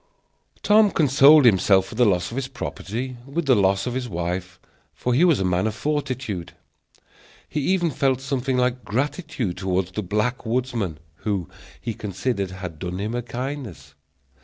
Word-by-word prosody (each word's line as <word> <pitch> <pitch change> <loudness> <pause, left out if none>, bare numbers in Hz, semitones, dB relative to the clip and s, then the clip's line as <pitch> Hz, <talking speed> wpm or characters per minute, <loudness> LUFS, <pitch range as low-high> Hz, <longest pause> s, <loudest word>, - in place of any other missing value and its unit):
Tom 210 0 +6
consoled 145 -2 +6
himself 95 -3 +5
for 95 - -10
the 120 +1 +3
loss 90 -1 +1
of - - -6
his 135 -1 -2
property, 125 +2 -5
with 160 +4 -2
the 135 - +5
loss 100 -2 +2
of 125 - -2
his 125 -1 -3
wife, 90 +1 -4 0.4
for 125 - -1
he 140 +8 +4
was 170 -6 +4
a 95 - 0
man 90 +3 +1
of 110 - -3
fortitude. 130 - -3 0.9
He 150 - -3
even 175 +2 +1
felt 135 -2 +1
something 130 -1 -1
like 125 0 0
gratitude 140 - -2
toward 95 -1 -1
the 100 +3 -4
black 105 +6 -1
woodsman, 115 -8 -2 0.2
who, 100 -6 -2 0.3
he 115 - -4
considered, 100 0 -2
had 90 -4 -7
done 90 0 -4
him 105 +3 -3
a 120 - -1
kindness. 120 - -6
120 Hz, 165 wpm, -23 LUFS, 95-135 Hz, 0.9 s, Tom